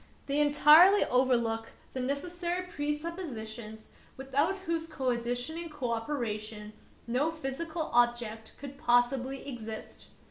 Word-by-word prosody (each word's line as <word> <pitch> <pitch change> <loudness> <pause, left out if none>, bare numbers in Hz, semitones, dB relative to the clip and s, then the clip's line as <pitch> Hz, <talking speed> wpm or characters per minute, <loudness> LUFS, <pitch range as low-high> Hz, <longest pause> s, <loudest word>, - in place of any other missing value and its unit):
They 280 +1 0
entirely 300 +7 +7
overlook 235 -3 +1 0.2
the 260 - -3
necessary 345 +7 -2
presuppositions 290 - -5 0.3
without 275 +7 +1
whose 330 -1 -1
conditioning 255 +4 -2
cooperation 225 -5 -3 0.3
no 255 +7 +1
physical 315 +2 -4
objects 240 -2 +1
could 280 -1 -9
possibly 250 +3 +1
exist. 225 -4 -8
265 Hz, 95 wpm, -30 LUFS, 235-310 Hz, 0.3 s, entirely